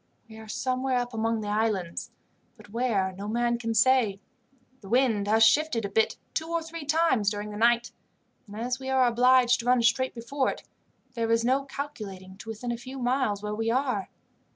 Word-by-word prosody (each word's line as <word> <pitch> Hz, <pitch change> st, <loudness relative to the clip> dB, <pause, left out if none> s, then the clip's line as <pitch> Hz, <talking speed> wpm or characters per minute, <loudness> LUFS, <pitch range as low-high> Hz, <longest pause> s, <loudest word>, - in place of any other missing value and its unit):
We 220 Hz, 0 st, -12 dB
are 220 Hz, -, -11 dB
somewhere 255 Hz, +3 st, -1 dB
up 245 Hz, 0 st, -2 dB
among 225 Hz, 0 st, -1 dB
the 210 Hz, -, -5 dB
islands, 205 Hz, -5 st, -1 dB, 0.5 s
but 205 Hz, -, -16 dB
where, 220 Hz, -5 st, 0 dB
no 195 Hz, +2 st, -7 dB
man 235 Hz, +2 st, 0 dB
can 230 Hz, -1 st, -2 dB
say. 230 Hz, -4 st, +3 dB, 0.6 s
The 195 Hz, -, -12 dB
wind 230 Hz, -4 st, +2 dB
has 220 Hz, +2 st, +4 dB
shifted 235 Hz, -1 st, +3 dB
a -, -, -3 dB
bit 220 Hz, +3 st, +1 dB, 0.2 s
two 320 Hz, -, -2 dB
or 335 Hz, 0 st, -1 dB
three 325 Hz, -1 st, -8 dB
times 290 Hz, -9 st, +2 dB
during 210 Hz, 0 st, -5 dB
the -, -, -7 dB
night, 235 Hz, +1 st, +3 dB, 0.6 s
and, 205 Hz, -, -10 dB
as 245 Hz, +3 st, -2 dB
we 265 Hz, 0 st, -6 dB
are 260 Hz, -1 st, +4 dB
obliged 245 Hz, +1 st, +4 dB
to 235 Hz, -, -5 dB
run 250 Hz, -1 st, +4 dB
straight 260 Hz, +3 st, +2 dB
before 260 Hz, +4 st, -1 dB
it, -, -, -6 dB, 0.5 s
there 230 Hz, -2 st, -2 dB
is 230 Hz, 0 st, +2 dB
no 265 Hz, +3 st, +2 dB
calculating 205 Hz, -10 st, -7 dB
to 225 Hz, -, -10 dB
within 225 Hz, +2 st, -4 dB
a 235 Hz, -, -3 dB
few 260 Hz, +3 st, -9 dB
miles 245 Hz, -5 st, 0 dB
where 210 Hz, 0 st, -3 dB
we 225 Hz, +1 st, -1 dB
are. 250 Hz, -5 st, 0 dB
235 Hz, 200 wpm, -27 LUFS, 215-255 Hz, 0.6 s, has